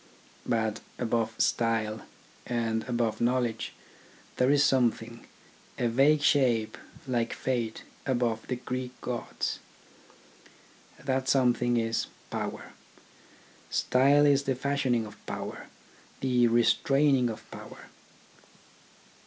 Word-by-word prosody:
But 110 -3 0 0.2
above 115 -2 -1
style, 115 -2 +1 0.5
and 115 -2 -1
above 120 -2 0
knowledge, 120 -1 0 0.6
there 125 - +3
is 145 0 +5
something, 120 -2 0 0.5
a 120 - +1
vague 145 +5 +4
shape 120 -9 +3 0.3
like 120 -2 0
fate 120 -4 -2 0.2
above 120 -4 0
the 125 - -1
Greek 125 0 -5
gods. 120 -1 -3 1.5
That 130 -1 0
something 120 -2 +3
is 115 -1 0 0.2
Power. - - -4 1.0
Style 140 +3 +4
is 140 -1 +3
the 135 - +1
fashioning 130 -3 0
of 105 - -13
power, - - -6 0.5
the 125 -2 +3
restraining 130 +3 +3
of 110 0 -7
power. - - -11
120 Hz, 100 wpm, -28 LUFS, 115-130 Hz, 1.5 s, is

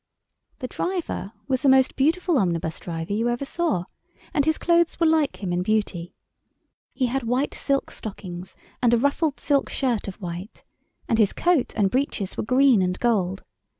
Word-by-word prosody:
The 255 - -5
driver 350 - -3 0.2
was 260 -2 0
the 275 - +4
most 265 0 +4
beautiful 325 +2 +2
omnibus 165 -4 -1
driver 165 +2 -4
you 230 +3 +1
ever 240 +3 -2
saw, 315 - -1 0.5
and 285 - +2
his 315 0 +2
clothes 340 -1 +2
were 335 - +3
like 315 -8 +2
him 180 -2 -1
in 175 - 0
beauty. 185 -4 -1 0.8
He 260 - 0
had 260 +2 -1
white 250 +4 0
silk 275 -1 -1
stockings 185 -4 -8 0.3
and 240 -1 +4
a - - +3
ruffled 285 +4 +1
silk 280 -2 +1
shirt 245 -7 -1
of 195 - -5
white, 180 +2 -7 0.4
and 225 - +1
his 210 -3 +4
coat 345 -7 +1
and 200 -3 +2
breeches 250 -7 -1
were - - -2
green 255 -2 +4
and 180 0 0
gold. 195 -6 0
240 Hz, 175 wpm, -24 LUFS, 190-280 Hz, 0.8 s, the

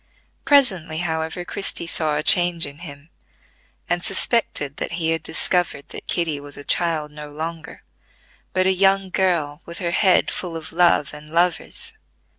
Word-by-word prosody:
Presently, 190 - +3
however, 160 +1 -2
Christie 195 -3 -2
saw 155 -2 0
a 150 - -2
change 175 -1 +4
in 145 +1 -10
him, 150 -1 -11 0.8
and 175 0 -1
suspected 190 - 0
that - - -4
he 165 -1 0
had 165 - 0
discovered 165 -2 -1
that - - -9
Kitty 160 -4 -1
was 145 0 -9
a 145 - -6
child 155 -2 +1
no 150 0 -9
longer, 160 +2 -7 0.7
but 185 0 +1
a 190 - +4
young 195 0 +3
girl 170 -7 +1
with 170 +1 -7
her 170 -2 -2
head 185 +1 +3
full 175 -3 -4
of 160 - -9
love 170 -4 +3
and 150 0 -11
lovers. 175 - 0
165 Hz, 160 wpm, -22 LUFS, 155-180 Hz, 0.8 s, change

